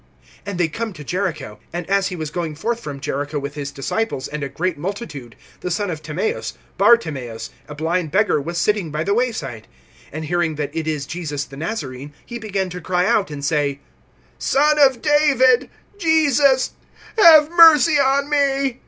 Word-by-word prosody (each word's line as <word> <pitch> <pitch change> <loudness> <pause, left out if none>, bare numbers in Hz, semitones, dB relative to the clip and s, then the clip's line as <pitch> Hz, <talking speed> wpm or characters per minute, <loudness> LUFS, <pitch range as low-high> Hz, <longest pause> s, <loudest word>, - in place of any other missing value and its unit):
(46)And 200 -3 -4
they 175 -2 +2
come 220 +6 -5
to 150 - -10
Jericho. 155 - -3
And 175 0 -5
as 195 0 +2
he 185 - -5
was 155 -3 -5
going 165 -3 -3
forth 230 +9 -2
from 145 -10 -7
Jericho 145 +1 -3
with 140 0 -4
his 145 -1 -5
disciples 140 +2 -3
and 150 0 -6
a 140 - -3
great 170 +5 -2
multitude, 150 - -6 0.2
the 180 - -4
son 205 +2 -1
of 155 -2 -6
Timaeus, 160 +8 -3 0.3
Bartimaeus, 145 - +1 0.2
a 150 - -8
blind 165 +2 -1
beggar, 190 -3 +2
was 170 +4 -5
sitting 205 -2 0
by 150 +1 -2
the 200 - 0
way 245 +3 +1
side. 135 - -7 0.4
(47)And 155 +2 -5
hearing 165 0 -1
that 145 0 -4
it 160 -1 -3
is 150 -3 -2
Jesus 150 -3 -4
the 135 - -12
Nazarene, 145 - -5
he 235 0 -7
began 195 -4 -3
to 180 0 -7
cry 180 0 0
out, 195 -1 +2
and 145 -2 -6
say: 145 -2 0 0.6
Son 300 +2 +2
of 265 -4 +4
David, 275 -4 +4 0.3
Jesus, 290 -6 +3 0.5
have 315 -5 +8
mercy 320 -3 +7
on 280 +1 +2
me. 275 -3 +1
180 Hz, 180 wpm, -20 LUFS, 150-235 Hz, 0.6 s, have